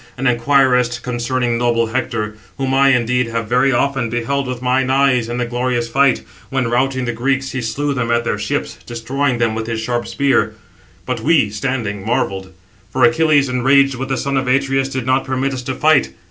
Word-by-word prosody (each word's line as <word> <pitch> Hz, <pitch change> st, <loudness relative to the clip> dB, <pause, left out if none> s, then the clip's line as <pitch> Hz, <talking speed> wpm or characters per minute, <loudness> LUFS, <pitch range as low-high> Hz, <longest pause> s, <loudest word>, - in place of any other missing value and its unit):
and 135 Hz, +1 st, 0 dB
inquirest 125 Hz, -1 st, +2 dB
concerning 120 Hz, -1 st, -1 dB
noble 120 Hz, -1 st, +2 dB
Hector; 110 Hz, -3 st, -3 dB, 0.2 s
whom 135 Hz, -1 st, -1 dB
I, 135 Hz, +1 st, +4 dB
indeed, 125 Hz, -1 st, +2 dB
have 115 Hz, -1 st, -3 dB
very 125 Hz, +3 st, +3 dB
often 135 Hz, -1 st, 0 dB
beheld 125 Hz, +4 st, -2 dB
with 125 Hz, -1 st, -4 dB
mine 130 Hz, +1 st, +1 dB
eyes 130 Hz, -3 st, +2 dB
in 120 Hz, -, -3 dB
the 125 Hz, -, -1 dB
glorious 120 Hz, 0 st, -1 dB
fight, 135 Hz, +2 st, +2 dB, 0.3 s
when, 135 Hz, -2 st, -1 dB
routing 130 Hz, +1 st, 0 dB
the 120 Hz, -, -1 dB
Greeks, 135 Hz, +3 st, -1 dB
he 130 Hz, -, -3 dB
slew 140 Hz, +5 st, -2 dB
them 125 Hz, -3 st, -2 dB
at 120 Hz, 0 st, +2 dB
their 105 Hz, -3 st, -2 dB
ships, 105 Hz, -, -3 dB
destroying 125 Hz, +3 st, -2 dB
[them] 115 Hz, -2 st, +1 dB
with 110 Hz, 0 st, -4 dB
his 115 Hz, -1 st, -2 dB
sharp 120 Hz, +1 st, -2 dB
spear; 140 Hz, -1 st, +1 dB, 0.5 s
but -, -, -2 dB
we, 145 Hz, -11 st, +2 dB
standing, 105 Hz, -3 st, -3 dB
marvelled; 95 Hz, -4 st, -2 dB, 0.4 s
for 130 Hz, +1 st, 0 dB
Achilles, 155 Hz, -3 st, +4 dB
enraged 135 Hz, +2 st, +3 dB
with 135 Hz, +2 st, -5 dB
the 135 Hz, -, 0 dB
son 140 Hz, +1 st, -1 dB
of 130 Hz, -1 st, -1 dB
Atreus, 135 Hz, +1 st, +1 dB
did 130 Hz, -3 st, -4 dB
not 130 Hz, +1 st, +2 dB
permit 135 Hz, +1 st, -1 dB
us 130 Hz, -, -4 dB
to 130 Hz, +1 st, -4 dB
fight. 150 Hz, -, +3 dB
125 Hz, 195 wpm, -18 LUFS, 120-135 Hz, 0.5 s, I